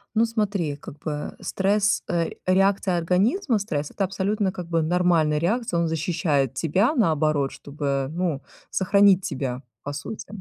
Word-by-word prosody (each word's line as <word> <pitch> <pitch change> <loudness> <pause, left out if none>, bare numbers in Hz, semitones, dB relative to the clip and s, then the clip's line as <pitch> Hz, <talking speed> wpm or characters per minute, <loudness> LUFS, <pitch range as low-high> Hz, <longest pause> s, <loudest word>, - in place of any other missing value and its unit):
Ну, 225 - +4
смотри, 205 -9 -1
как 145 - -11
бы 150 -1 -4
стресс, 200 +1 +1
э, 170 -1 0
реакция 190 0 +2
организма, 215 - +1
стресс- 150 -8 -3
это 200 - +1
абсолютно, 195 +1 0
как 180 -2 -7
бы, 165 -1 +1
нормальная 165 -2 +2
реакция, 205 0 0
он 165 - +1
защищает 155 -4 0
тебя, 195 - +1
наоборот, 155 - +2
чтобы, 140 -2 -3
ну, 165 -4 -2 0.3
сохранить 195 0 +4
тебя 130 -5 -3 0.2
по 145 - -4
сути. 155 +9 -6
175 Hz, 145 wpm, -24 LUFS, 150-200 Hz, 0.3 s, Ну